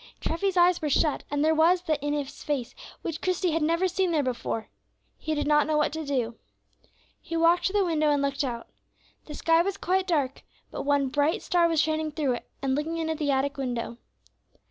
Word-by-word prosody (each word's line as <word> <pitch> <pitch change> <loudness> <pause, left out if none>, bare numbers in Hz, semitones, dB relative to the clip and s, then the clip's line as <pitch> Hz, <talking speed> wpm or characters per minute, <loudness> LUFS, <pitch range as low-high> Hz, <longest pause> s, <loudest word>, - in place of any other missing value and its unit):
Treffy's 370 +3 -1
eyes 350 0 +4
were 305 - -1
shut, 295 +1 +1
and 290 +1 0
there 320 - +4
was 340 +3 +3
that 310 -4 -1
in 290 +1 -1
his 290 -2 -4
face 275 -5 -2 0.3
which 325 -1 -4
Christie 365 -1 0
had 325 +1 0
never 335 +4 +2
seen 370 +1 0
there 310 -3 +2
before. 235 -3 -3 0.5
He 315 - -3
did 295 - -1
not 295 0 +3
know 310 -1 +1
what 300 0 +1
to 320 0 -4
do. 250 -5 -2 0.8
He 330 - -4
walked 340 +1 +4
to 380 - -4
the 405 -2 +3
window 310 -3 +1
and 290 -1 +2
looked 280 +1 0
out. 235 -3 -4 0.6
The 300 - -8
sky 330 +2 +3
was 395 +2 -2
quite 375 +1 0
dark, 285 -7 0 0.3
but - - -5
one 285 -1 +2
bright 295 +9 +1
star 345 -2 +3
was 325 -2 +1
shining 315 0 0
through 290 -4 0
it 240 - -7
and 270 -1 +1
looking 305 +4 -2
in 320 -1 -1
at 315 - -4
the 295 -2 0
attic 275 +1 0
window. 240 -3 -3
310 Hz, 215 wpm, -27 LUFS, 280-335 Hz, 0.8 s, eyes